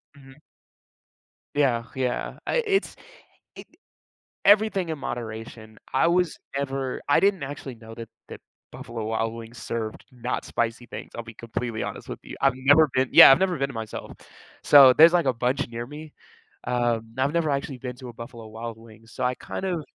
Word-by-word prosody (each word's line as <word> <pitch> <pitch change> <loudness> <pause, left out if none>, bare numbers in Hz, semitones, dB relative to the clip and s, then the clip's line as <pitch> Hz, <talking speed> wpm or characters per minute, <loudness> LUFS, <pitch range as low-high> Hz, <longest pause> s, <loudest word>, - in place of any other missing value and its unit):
Mhm. 135 +1 -17 1.1
Yeah 130 -5 +2
yeah, 130 -2 -2
I 485 -1 +1
it's 390 -2 0 0.6
it - - -11 0.8
everything 205 -4 +4
in 160 - -4
moderation, 110 -3 -7 0.2
I 135 +5 +4
was 175 -1 +1 0.2
never 135 -1 -3
I 145 - +4
didn't 195 -4 +2
actually 135 -2 -7
know 115 0 -12
that 115 -1 -9 0.2
that - - -10 0.3
Buffalo 115 -2 -6
Wild 115 +1 -1
Wings 115 +1 -10
served 110 -2 -5
not 125 0 -4
spicy 120 +1 -2
things, - - -9
I'll 120 - -4
be 115 -1 -11
completely 115 0 -4
honest - - -6
with - - -6
you, - - -10
I've 135 -1 +4
never 145 +4 +5
been 130 0 +2
yeah, - - +11
I've 135 - +5
never 185 -1 +1
been 140 0 0
there - - -9
myself, 110 -1 -6 0.5
so, 140 -3 +8
there's, 165 +4 +8
like, 170 -4 +3
a 130 - +3
bunch 125 +4 -1
near 120 0 -6
me, 150 +2 -10 0.5
um, 120 -2 -1
I've 135 +3 +1
never 170 -2 +1
actually 140 -1 -3
been 125 0 -6
to 125 - -10
a - - -10
Buffalo 115 -1 -10
Wild 115 +1 -7
Wings, 115 0 -17
so, 130 - -5
I 125 0 +1
kind 190 - -6
of 175 -4 -2
125 Hz, 185 wpm, -25 LUFS, 115-145 Hz, 1.1 s, yeah